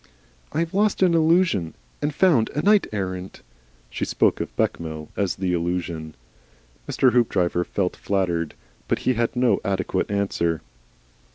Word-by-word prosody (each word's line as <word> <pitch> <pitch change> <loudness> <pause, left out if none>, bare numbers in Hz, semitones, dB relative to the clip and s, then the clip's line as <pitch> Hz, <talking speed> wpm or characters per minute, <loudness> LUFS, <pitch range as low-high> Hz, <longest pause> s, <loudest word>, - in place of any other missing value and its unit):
"I 160 - 0
have 165 -1 -3
lost 205 0 +2
an 180 -2 +4
Illusion 160 - +2 0.3
and 150 - 0
found 145 -8 +3
a 150 - 0
Knight 210 0 +4
errant." 95 -2 -5 0.5
She - - -3
spoke - - +2
of - - -6
Bechamel 80 -2 -2
as 100 -3 0
the 90 -1 -1
Illusion. 85 -2 -3 0.7
Mr. 130 - +3
Hoopdriver 90 -8 +2
felt 90 0 -2
flattered. 85 -5 -1 0.3
But - - +1
he 130 - +4
had 115 +1 -1
no 125 -6 +3
adequate 95 -1 -1
answer. 90 -6 -1
100 Hz, 145 wpm, -23 LUFS, 85-145 Hz, 0.7 s, an